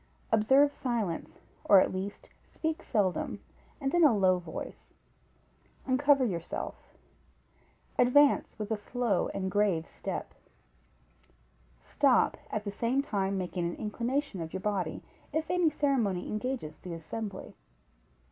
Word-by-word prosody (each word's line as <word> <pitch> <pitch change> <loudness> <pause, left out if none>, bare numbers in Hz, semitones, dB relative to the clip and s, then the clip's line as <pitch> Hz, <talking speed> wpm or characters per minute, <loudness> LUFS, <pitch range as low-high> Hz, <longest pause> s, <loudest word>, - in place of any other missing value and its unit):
Observe 265 +7 +5
silence, 225 -10 -3 0.2
or 200 - +8
at - - +2
least 190 +2 -5 0.2
speak 320 +1 -2
seldom, 200 - 0 0.4
and 275 -1 -2
in 345 -1 +4
a 260 -8 +6
low 185 -2 +4
voice; 175 - -8 0.9
uncover 275 0 +4
yourself; 170 -6 -5 1.0
advance 275 +4 +4
with 210 0 -5
a - - +3
slow 215 -2 0
and 190 -1 -2
grave 195 -5 +2
step; - - -6 1.5
stop, - - +3
at 215 - -3
the 200 - -4
same 240 +6 0
time 195 -7 -1
making 180 -1 -3
an - - -5
inclination 235 - -2
of 160 0 -6
your 190 - -2
body, 190 -5 -2 0.3
if 315 +2 -1
any 360 -2 +3
ceremony 250 -12 0
engages 215 -8 -4
the 175 -2 -6
assembly. 200 +5 -6
215 Hz, 125 wpm, -30 LUFS, 190-270 Hz, 1.5 s, or